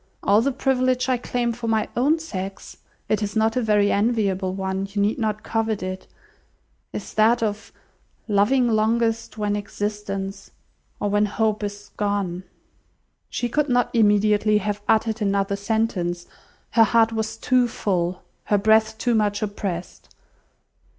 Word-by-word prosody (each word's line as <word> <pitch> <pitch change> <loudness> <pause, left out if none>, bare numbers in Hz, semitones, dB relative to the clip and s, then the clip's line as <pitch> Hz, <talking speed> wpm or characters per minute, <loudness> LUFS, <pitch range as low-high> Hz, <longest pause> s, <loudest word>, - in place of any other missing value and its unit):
All 205 +2 +4
the 275 +4 +1
privilege 255 -1 +1
I 255 - +2
claim 240 -1 -1
for 230 0 -6
my 220 -1 +1
own 285 +7 +3
sex 195 - -7 0.3
(it 215 - 0
is 205 0 -3
not 220 0 +2
a 255 - +1
very 210 -2 +3
enviable 200 -4 +1
one; 190 0 -2
you 200 +1 -4
need 205 +5 +1
not 215 -2 -2
covet 225 -3 -1
it), 185 0 -5 0.8
is - - -7
that 225 +2 +3
of 210 -1 -3 0.6
loving 230 +5 +3
longest, 225 0 0
when 205 -1 0
existence 200 -1 -4 0.5
or 205 - -1
when 205 +1 +3
hope 215 +1 0
is 205 0 -6
gone." 200 -3 -2 0.8
She 245 - -2
could 295 +4 0
not 245 -1 +2
immediately 210 -1 +3
have 210 0 -2
uttered 220 0 +2
another 200 -1 +1
sentence; 200 -5 -1 0.5
her 230 - +6
heart 230 0 +3
was 220 0 -3
too 250 +1 +2
full, 180 -5 -2 0.2
her 205 - +2
breath 220 +1 +3
too 240 +1 0
much 210 -1 +1
oppressed. 195 -4 -5
215 Hz, 145 wpm, -23 LUFS, 200-230 Hz, 0.8 s, her